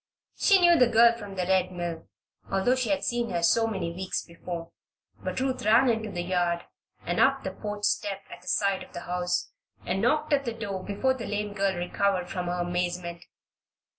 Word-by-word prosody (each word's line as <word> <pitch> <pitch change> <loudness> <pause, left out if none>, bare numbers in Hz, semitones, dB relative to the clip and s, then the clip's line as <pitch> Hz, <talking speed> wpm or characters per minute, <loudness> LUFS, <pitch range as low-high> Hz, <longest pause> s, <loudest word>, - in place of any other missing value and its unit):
She 395 -3 +5
knew 345 -2 +6
the 250 - +6
girl 235 0 +6
from 205 -4 -9
the 180 -1 -1
Red 185 0 +2
Mill, 175 -2 -5 0.4
although 195 +6 +2
she 255 -2 -1
had 290 -1 +1
seen 240 -1 0
her 170 -3 -1
so 225 +6 +4
many 185 -6 -3
weeks 185 +1 -3
before; 170 0 -7 0.5
but - - -2
Ruth 260 0 -1
ran 225 +5 +5
into 220 -1 -2
the 175 -3 -3
yard 175 -1 0 0.4
and - - -1
up - - +4
the - - -3
porch 205 -1 -6
steps 200 -1 0
at - - -10
the 180 - -19
side 195 +1 +1
of - - -12
the 175 - -6
house, 180 0 -2 0.3
and 190 +2 -1
knocked 300 +6 +2
at 280 -1 +3
the 235 -3 -3
door 200 -4 -4
before 235 +6 0
the 245 -3 -6
lame 210 0 -2
girl 195 -1 0
recovered 180 +1 0
from 180 -1 -3
her 175 0 -1
amazement. 175 -1 -3
195 Hz, 200 wpm, -27 LUFS, 180-230 Hz, 0.5 s, knew